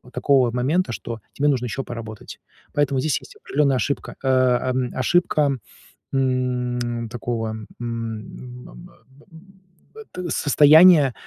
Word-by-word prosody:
вот 125 - -17
такого 135 -3 +3
вот 120 - -3
момента, 145 +9 0
что 115 +1 -6
тебе 145 - -1
нужно 130 -4 0
ещё 130 +3 -4
поработать. 110 -3 -9 0.3
Поэтому 145 -2 +1
здесь 150 +2 0
есть - - -15
определённая 140 -2 0
ошибка, 140 +3 -3
э, - - +1
эм, 130 0 +1
ошибка, 150 0 +2 0.6
м, 125 -3 -1
такого, 115 -1 -3
м, 110 -1 -7
ам, 115 +1 -7
м, 175 - -13 1.0
б 440 -1 -11
т 180 -1 -6
состояния, 150 0 +6
130 Hz, 135 wpm, -22 LUFS, 120-145 Hz, 1.0 s, состояния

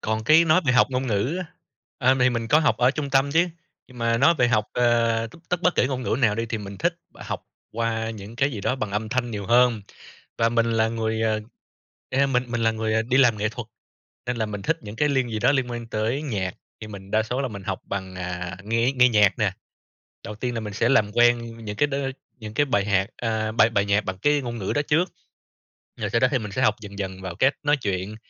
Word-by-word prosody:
Còn 110 0 -2
cái 155 +7 +6
nói 165 +2 +4
về 125 - +4
học 125 - +5
ngôn 130 0 -1
ngữ 120 - 0
á, 185 - -3 0.5
ờ, 130 -2 +4
thì 125 +1 +5
mình 115 -2 -3
có 150 - +5
học 155 -2 +2
ở 125 +1 +4
trung 140 0 -4
tâm 135 +1 +3
chứ, 170 +3 +3 0.4
nhưng 125 - -14
mà 115 0 +1
nói 170 - +5
về 125 -6 +2
học, 110 -3 +2
ờ, 115 -2 +2 0.2
tất 180 -1 -1
bất 180 - +3
kể - - +3
ngôn 130 -1 -3
ngữ 120 - 0
nào 110 -5 +3
đi 115 +2 -2
thì 115 0 -3
mình 100 -1 -8
thích - - +1 0.2
học - - -6 0.3
qua 115 0 -1
những 110 +1 -9
cái 135 +3 +2
gì 110 -7 -5
đó 125 - 0
bằng 110 -5 -3
âm 105 +2 -2
thanh 120 +1 -1
nhiều 100 -3 -5
hơn. 120 -1 +4 0.6
Và 115 - +3
mình 115 0 +1
là 110 0 +2
người, 110 -1 -2
à, 110 -1 +1 0.7
a, 135 +1 +2
mình 125 -2 +1
mình 120 -1 -2
là 115 - +4
người 110 0 0
đi 125 +3 0
làm 125 -5 +5
nghệ 105 +1 0
thuật, 115 +1 -7 0.6
nên 125 0 -2
là 110 -1 -1
mình 105 -2 -6
thích - - 0
những 105 0 -9
cái 150 +5 +2
link 130 -4 0
gì 110 - -2
đó 120 - +3
liên 130 -3 0
quan 120 -1 -5
tới 115 +5 -2
nhạc, 100 -10 -3 0.3
thì 110 - -7
mình 100 -2 -10
đa 110 +1 +2
số 125 +4 -3
là 135 - -1
mình 100 -4 -8
học 95 -2 -3
bằng, 95 -2 -5
à, 90 -1 -5
nghe 115 +4 +1
nghe 125 -1 +5
nhạc 105 -4 +3
nè. - - +1 0.7
Đầu 105 - -6
tiên 120 +3 -3
là 115 - -2
mình 105 -2 -6
sẽ 115 +3 +1
làm 105 -6 +3
quen 115 -1 +2
những 105 0 -5
cái 145 - +2
đ 140 - -3 0.4
những 110 -1 -8
cái 145 +6 +2
bài 120 -7 +1
hạc 95 -1 +1
à, 110 -2 -1
bài 110 0 +4
bài 100 -3 +1
nhạc 100 +1 +1
bằng 95 0 -4
cái 145 +8 +2
ngôn 120 -2 -5
ngữ 95 -4 -2
đó 145 - +1
trước, 170 +5 +2 0.9
rồi - - -3
sau 115 - +1
đó 130 - +5
thì 135 - +2
mình 105 -3 -6
sẽ - - -2
học 105 - +3
dần 100 -1 -9
dần 95 -1 -5
vào 90 -2 -6
cách 135 - +2
nói 145 0 +3
chuyện. 100 -3 -3
115 Hz, 255 wpm, -24 LUFS, 105-125 Hz, 0.9 s, cái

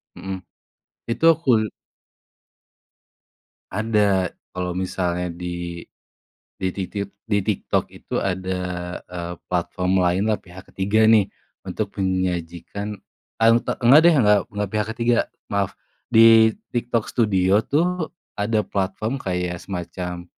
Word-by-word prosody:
Mhm, 95 +1 -6 0.7
itu 115 - -3
akul 125 - +2 2.0
Ada 105 -3 +2 0.2
kalau 90 0 -3
misalnya 90 -2 -2
di 85 -1 -5 0.8
di 95 - -1
titit 100 +1 -4
di 105 -2 +1
TikTok 100 0 0
itu - - -5
ada, 95 -1 -2 0.4
eee, 90 -1 -6
platform 90 +1 0
lain 90 +3 +2
lah, 105 - +2
pihak 95 +1 -13
ketiga 105 +3 +2
nih, 110 -3 +5 0.4
untuk 100 +2 -3
menyajikan, 95 +2 -2 0.4
auta 115 +1 +3
nggak 130 +5 +7
deh 170 - +7
nggak 105 -4 +5
nggak 105 -1 -2
pihak 105 0 0
ketiga, 120 0 +2 0.4
maaf, 100 -1 0 0.4
di 115 0 +7 0.2
TikTok 120 -2 0
studio 100 -3 +3
tuh 170 +5 0 0.3
ada 105 +1 +1
platform 100 +6 -2
kayak 90 -2 -2
semacam, 90 -1 -5
95 Hz, 110 wpm, -22 LUFS, 90-110 Hz, 2.0 s, nggak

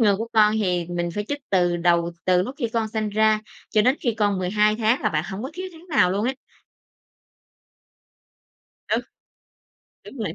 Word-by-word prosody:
ngừa 205 -4 +4
của 225 +2 -4
con 215 -1 +5
thì 180 -3 0
mình 175 0 -2
phải 205 +4 -3
chích 290 0 -3
từ 175 -2 +2
đầu, 170 0 +2
từ 180 0 +4
lúc 255 +7 -5
khi 235 -5 -1
con 225 -1 -1
sanh 215 -1 -2
ra 215 0 +3 0.3
cho 215 -1 +3
đến 255 +5 +3
khi 235 -4 0
con 205 -3 +1
12 210 +3 +2
tháng 230 +4 +1
là - - +2
bạn 155 0 -1
hổng 200 +4 -5
có 265 - -5
thiếu 370 +1 -5
tháng 335 +1 -15
nào 270 - +3
luôn 200 +4 -1
á. 265 - 0 2.5
Ừ. - - +1 1.0
Đúng 275 - -11
rồi. 195 -6 -3
210 Hz, 190 wpm, -23 LUFS, 180-230 Hz, 2.5 s, con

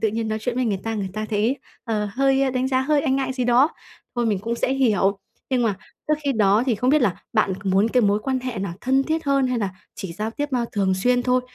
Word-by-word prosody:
tự 220 - +2
nhiên 225 +1 -2
nói 215 - -1
chuyện 235 +2 -3
với 255 - 0
người 200 -5 -1
ta, 225 - -2
người 200 -3 -2
ta 215 +1 -4
thấy, 220 +6 +1 0.3
ờ, 215 -3 -1
hơi 270 +1 +2
đánh 255 +1 0
giá, 260 -1 +2
hơi 290 +2 +2
e 295 - 0
ngại 265 -1 0
gì 255 -1 -2
đó. 245 +5 +5 0.5
Thôi 240 - +1
mình 210 -3 +1
cũng 230 +4 -3
sẽ 255 - 0
hiểu. 205 -7 +2 0.3
Nhưng 255 -2 +2
mà 215 -4 +1 0.3
trước 305 - +4
khi 280 - +2
đó 210 -1 +3
thì 240 - +2
không 250 +5 +1
biết 300 -1 +4
là 195 -7 +2 0.2
bạn 215 -3 +2
muốn 195 +3 +3
cái 250 +2 +3
mối 205 -2 +3
quan 265 -1 0
hệ 255 -4 -4
là 190 -3 -3
thân 265 +2 +2
thiết 320 +3 -2
hơn 275 -1 +2
hay 250 -1 0
là 205 -3 0 0.3
chỉ 195 -5 -6
giao 215 +5 -3
tiếp 290 +4 -3 0.2
thường 195 -2 +1
xuyên 245 +6 +2
thôi? 250 0 +2
240 Hz, 265 wpm, -23 LUFS, 210-265 Hz, 0.5 s, đó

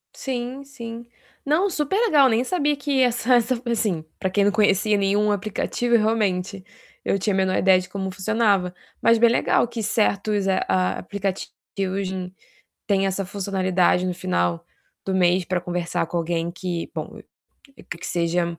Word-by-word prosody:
Sim, 255 +1 -4
sim. 235 -4 -9 0.4
Não, 330 +8 +2
superlegal, 310 - +3
nem 230 +2 +2
sabia 295 0 0
que 285 -2 0
essa 245 0 +3
essa 240 +2 +2
pra, 240 -1 -4
assim, 190 -8 -1 0.2
pra 190 - -1
quem 200 +2 +2
não 205 - +3
conhecia 210 0 +2
nenhum 205 +1 +2
aplicativo, 215 +4 -1
realmente 200 -4 0 0.4
eu 195 - +1
tinha 205 +2 -1
a 190 - 0
menor 190 -1 +1
ideia 190 -1 +5
de 180 - -7
como 190 0 -4
funcionava, 200 -2 +1 0.3
mas 230 0 +5
bem 235 +1 +5
legal 235 - +2
que 230 -1 -5
certos, 210 -1 0
ah, 190 - +2
a 185 -1 +1
aplicativos 195 0 -4 0.2
de 195 -1 0
hoje 190 0 -3
em 180 0 -6 0.5
têm 195 -1 +2
essa 195 0 -2
funcionalidade 185 -2 +1
no 180 - -2
final 90 - -1 0.4
do 190 - -2
mês 180 0 +3
pra 180 0 -1
conversar 175 -1 -2
com 175 - -5
alguém 170 0 -1
que, 180 -2 -5
bom, - - -6 0.8
que - - -6
seja 170 0 -1
195 Hz, 170 wpm, -23 LUFS, 185-230 Hz, 0.8 s, ideia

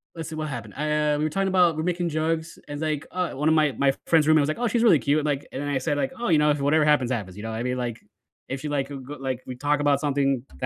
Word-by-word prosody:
let's 165 -2 -6
see 160 - -6
what 155 -1 -3
happened? 115 -5 -6
Eh, 150 0 +1
we 150 - -1
were 155 - +1
talking 195 +5 0
about 180 -4 +3
we're 155 - -1
making 175 -1 -1
jokes, 160 +1 -2
and, 145 +1 -6
like, 155 -2 -2
uh, 180 -1 -2
one 150 +3 -2
of 160 - +4
my 150 -2 +3
my 135 +3 +2
friend's 160 -2 +4
roommate 155 -1 +5
was 145 - 0
like, 155 - -2
"Oh, 245 - +1
she's 230 +1 +1
really 175 -10 +6
cute," 145 +5 +1
like, 145 -2 -1
and 135 - -5
then 145 - -3
I 140 - +1
said, 145 +1 -1
like, 145 - -1
"Oh, 240 - -2
you 160 - +5
know, 150 - +3
if 145 - -1
whatever 150 +2 +3
happens 145 -5 +3
happens," 100 -6 -4
you 105 - -8
know 110 - -4
what 110 - -4
I - - -2
mean? 125 0 -1
Like, 120 -2 -3 0.5
if 135 +1 -3
she 150 - -4
like, 140 -1 -1
a 140 - -6
g 135 +2 -8
like, 130 -2 -3
we 130 - -5
talk 145 +3 0
about 145 -1 +2
something 140 -3 +1 0.2
that - - -2
150 Hz, 320 wpm, -25 LUFS, 135-155 Hz, 0.5 s, really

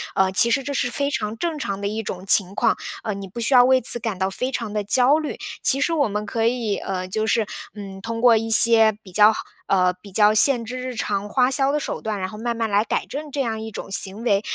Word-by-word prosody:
呃， 190 0 +2
其 230 +5 +5
实 270 +4 +1
这 280 +2 -5
是 245 - -1
非 280 +3 -2
常 215 -3 -4
正 325 -1 -3
常 200 -6 -4
的 200 - -3
一 220 +2 -4
种 190 -3 -7
情 195 0 +5
况， 230 -2 +1 0.3
呃， 215 - -3
你 195 -1 -8
不 215 +6 -9
需 250 +4 0
要 245 - +7
为 260 +1 +4
此 240 0 +2
感 220 -5 -4
到 190 0 -1
非 255 +7 -3
常 230 -5 -5
地 210 -1 -2
焦 255 +8 +3
虑。 310 - -5 0.2
其 270 - +3
实 330 +4 0
我 290 -5 +1
们， 210 0 -4
可 225 +2 -1
以， 230 -4 -2
呃， 185 -1 -5
就 215 +4 -2
是， 225 -2 +1 0.3
嗯， 195 -2 -9
通 230 +1 -5
过 235 -1 +5
一 225 +1 -2
些 225 -1 +6
比 185 - -14
较 210 +3 +5 0.4
呃， 185 -2 +2
比 200 - -14
较 210 +2 +4
限 230 +1 +4
制 250 +3 -6
日 255 -1 -6
常 205 -1 -3
花 255 +2 +2
销 270 +1 +1
的 300 - -1
手 - - -5
段， 215 -2 -4
然 185 - -3
后 210 - -10
慢 235 0 -3
慢 225 -1 -1
来 205 +1 +2
改 - - -3
正 295 +1 -8
这 280 - -2
样 225 -3 -3
一 220 - -7
种 - - -8
行 195 +3 -1
为。 200 -4 +1
225 Hz, 285 characters per minute, -21 LUFS, 200-250 Hz, 0.4 s, 要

